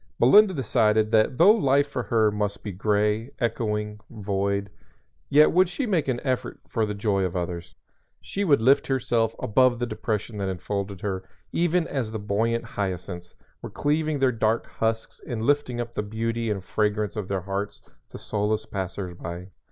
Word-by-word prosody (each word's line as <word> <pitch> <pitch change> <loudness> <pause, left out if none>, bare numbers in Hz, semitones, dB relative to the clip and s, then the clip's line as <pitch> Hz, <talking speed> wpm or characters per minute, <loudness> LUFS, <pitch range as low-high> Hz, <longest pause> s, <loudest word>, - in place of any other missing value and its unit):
Melinda 205 - +7
decided 110 -4 +2
that 110 +3 +3
though 180 +7 +8
life 140 -9 +3
for 135 -3 -3
her 110 -1 +2
must 105 -1 -2
be 105 - -4
gray, 105 +4 0
echoing, 105 -3 -1
void, 100 -2 -2 0.6
yet 150 +2 +6
would 185 +1 +4
she 275 - -2
make 180 - +1
an 125 -2 0
effort 130 -3 -2
for 110 -2 0
the 105 - -3
joy 100 -2 0
of 90 -1 -2
others. 85 -1 -4 0.4
She 200 - -3
would 145 - +4
lift 135 +5 +4
herself 120 -4 +1
above 125 +3 +3
the 120 - -1
depression 110 -2 -3
that 95 -1 -1
enfolded 100 +1 -4
her 95 -2 -4 0.2
even 175 0 +1
as 125 -6 -3
the 110 - -3
buoyant 110 +3 0
hyacinths 90 -5 -5 0.3
were - - -6
cleaving 155 +1 0
their 135 -2 +3
dark 110 -1 0
husks 110 0 -3
and 115 -2 -3
lifting 140 -2 +1
up 120 0 -4
the - - -1
beauty 115 +2 -2
and 100 -3 -2
fragrance 105 +1 0
of 105 -4 -4
their 95 -1 -2
hearts 100 +2 -4 0.3
to - - -9
solace 105 +1 -1
passers 95 -1 -4
by. 85 +2 -7
110 Hz, 175 wpm, -25 LUFS, 100-125 Hz, 0.6 s, though